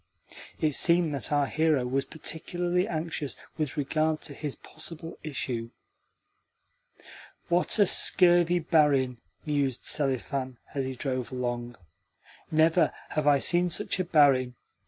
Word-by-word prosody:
(it 155 -2 +1
seemed 170 0 +3
that 140 0 -3
our 145 -1 +3
hero 155 -3 +1
was 135 +2 -1
particularly 175 +4 -2
anxious 155 -5 -4 0.2
with 155 -2 -2
regard 155 +2 0
to 145 - -7
his 145 0 -5
possible 165 +1 -8
issue). 125 -6 -4 1.8
"What 175 +5 +2
a 205 - +6
scurvy 175 -2 +4
barin!" 145 -7 +2 0.3
mused 140 -4 -1
Selifan 130 -2 -2 0.2
as 135 -2 -2
he 130 0 -4
drove 130 -1 -3
along. 120 -1 -3 0.7
"Never 160 +1 +3 0.2
have 155 -1 -1
I 145 -1 +6
seen 175 +5 +3
such 175 - -2
a - - +2
barin. 140 -7 +3
150 Hz, 125 wpm, -28 LUFS, 130-165 Hz, 1.8 s, a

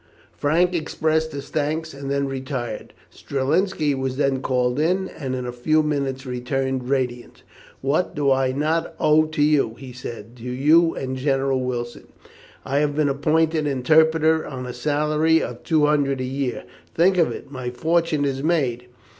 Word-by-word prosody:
Frank 170 +5 +2
expressed 160 -1 0
his 140 -1 -7
thanks, 155 +1 -2
and 140 0 -7
then 140 0 0
retired. 130 -4 -5 0.2
Strelinski 150 +3 0
was 130 -1 -3
then 135 -2 +1
called 125 0 0
in, 185 +5 +1
and 135 -4 -5
in 125 -1 -4
a 125 - -3
few 155 +6 +1
minutes 140 -3 -2
returned 130 0 -2
radiant. 125 -3 -2 0.4
"What 145 +7 0
do 140 -2 +2
I 130 -1 +2
not 155 +5 -1
owe 155 +1 +4
to 155 -1 -1
you," 145 -7 +2
he 130 -2 -10
said, 120 -1 -9
"to 115 - -13
you 155 +6 +4
and 130 -1 -4
General 135 -1 +1
Wilson? 120 -1 -4 0.6
I 140 +2 +1
have 145 -1 0
been 150 -1 +2
appointed 155 +2 +1
interpreter 160 +3 +3
on 130 -2 -6
a 125 - -6
salary 150 +4 +2
of 120 -4 -5
two 155 -3 +2
hundred 140 -2 +1
a - - -2
year. 135 0 -3 0.3
Think 180 +2 +4
of 165 - +3
it! 140 - -8
my 130 -3 -4
fortune 160 +3 0
is 135 -1 -2
made." 135 -7 0
140 Hz, 165 wpm, -22 LUFS, 130-155 Hz, 0.6 s, owe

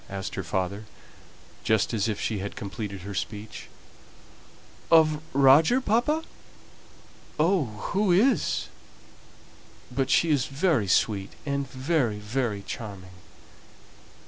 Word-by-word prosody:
asked 95 -1 -5
her - - -3
father, 95 +5 -3 0.8
just 110 +1 +1
as 110 -1 0
if 105 -2 -2
she 110 -3 -2
had 100 +1 -5
completed 100 -1 -6
her 100 +2 -7
speech. 105 +2 -6 1.2
"Of 155 -2 +5
Roger, 140 - +5
papa? 260 +7 +1 1.2
oh, 170 0 +3 0.3
who 200 -1 +2
is? 220 +7 +2 1.2
But 130 +1 -1
she 165 +4 +3
is 140 -4 +1
very 140 - +1
sweet, 100 0 +1
and 140 -2 -2
very, 130 -4 0
very 105 -1 -2
charming." 100 -5 -8
125 Hz, 110 wpm, -26 LUFS, 100-155 Hz, 1.2 s, Of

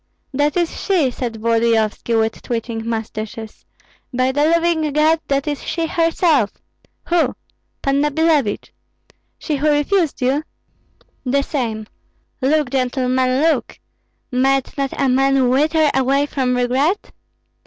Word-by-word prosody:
"That 290 +4 +1
is 345 -2 -1
she!" 340 -10 +2
said 240 -2 -4
Volodyovski, 230 0 +1
with 220 0 0
twitching 230 -1 -4
mustaches. 220 0 -6 0.5
"By 255 +1 +1
the 290 +2 +1
living 330 -1 +2
God, 310 +2 +3
that 275 +1 0
is 290 -2 -3
she 335 -1 -2
herself!" 325 - +2 0.6
"Who?" 345 -1 +2 0.5
"Panna 280 +1 +2
Billevich." 295 -7 0 0.6
"She 300 - -2
who 300 +2 +1
refused 300 +3 +1
you?" 270 +4 +2 0.8
"The 275 +2 +1
same. 230 -7 -3 0.6
Look, 285 0 +1
gentlemen, 255 0 +1
look! 325 0 0 0.5
Might 270 +1 +1
not 275 -1 -3
a 275 - +2
man 265 0 +3
wither 305 +3 +3
away 270 +2 +2
from 260 -3 -1
regret?" 265 +10 0
270 Hz, 120 wpm, -19 LUFS, 250-305 Hz, 0.8 s, God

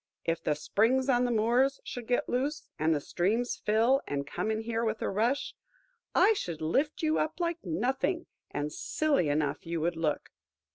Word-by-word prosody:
If 165 0 -1
the 150 - +1
springs 250 - +2
on 245 -1 +4
the 245 - 0
moors 240 +5 +2
should 240 -2 -7
get 245 - +1
loose, 285 +5 -1 0.2
and 160 +1 +3
the - - 0
streams 215 +11 -1
fill 230 +6 +3
and 140 0 -2
come 180 - -3
in 220 0 0
here 225 0 -2
with 220 -1 -1
a - - 0
rush, 235 +8 0 0.6
I 445 - +6
should 170 - -4
lift 280 - 0
you 310 0 +2
up 310 +3 -2
like 340 -1 -1
nothing, 255 - -1 0.2
and 145 +1 -3
silly 285 - +1
enough 145 0 0
you 165 0 -3
would 170 +1 0
look. 160 -2 -1
225 Hz, 185 wpm, -30 LUFS, 165-265 Hz, 0.6 s, I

